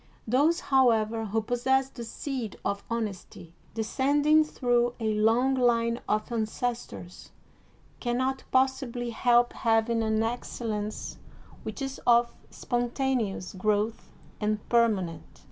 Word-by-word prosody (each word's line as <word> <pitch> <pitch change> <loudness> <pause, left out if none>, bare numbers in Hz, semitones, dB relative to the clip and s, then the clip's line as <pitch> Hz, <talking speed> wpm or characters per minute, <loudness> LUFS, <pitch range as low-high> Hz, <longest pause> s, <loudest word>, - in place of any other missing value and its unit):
Those, 290 +9 +3
however, 225 -4 +2
who 220 +1 -1
possess 260 +3 +1
the 240 - -8
seed 240 -1 -5
of 200 0 -1
honesty, 195 -6 -5 0.2
descending 290 +7 +3
through 245 -5 0
a 220 -1 0
long 225 +5 +3
line 235 -2 +2
of 215 0 +1
ances 235 +1 -2
tors, 175 +1 -11 0.7
can 240 -1 -1
not 260 +1 -1
possibly 260 -2 0
help 240 +1 +3
having 225 0 +1
an 220 0 +1
excellence 225 -2 -4 0.4
which 275 - -5
is 270 0 -5
of 235 0 +4 0.2
spontaneous 240 -5 -2
growth 210 +3 -1 0.3
and 210 0 -2
permanent. 210 -8 0
235 Hz, 115 wpm, -28 LUFS, 220-255 Hz, 0.7 s, of